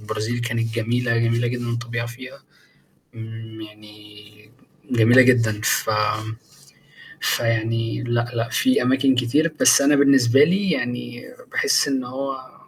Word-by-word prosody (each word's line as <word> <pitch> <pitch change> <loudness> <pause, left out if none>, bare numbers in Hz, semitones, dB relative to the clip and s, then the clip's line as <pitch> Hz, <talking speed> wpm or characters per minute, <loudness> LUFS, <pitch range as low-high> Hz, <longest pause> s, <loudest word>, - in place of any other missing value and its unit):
البرازيل 110 +3 -4
كانت 115 -1 -3
جميلة، 115 +1 -1
جميلة 115 +1 0
جدًا 120 0 -4
الطبيعة 120 0 -4
فيها، 130 +3 -12 0.7
امم 110 0 -10
يعني 105 -1 -15 0.6
جميلة 120 +2 +5
جدًا 115 -4 +2
ف 110 - 0 1.3
فيعني 115 0 -1
لأ، 120 -1 -2
لأ 115 0 -2
في 260 -2 +1
أماكن 130 +1 +2
كتير، 135 +7 0
بس - - +6
أنا 145 +1 +3
بالنسبة 135 -1 +4
لي 190 +4 0
يعني 120 0 -5 0.3
باحس - - +1
إن 135 -2 -2
هو 130 +1 -6
120 Hz, 125 wpm, -21 LUFS, 115-130 Hz, 1.3 s, بس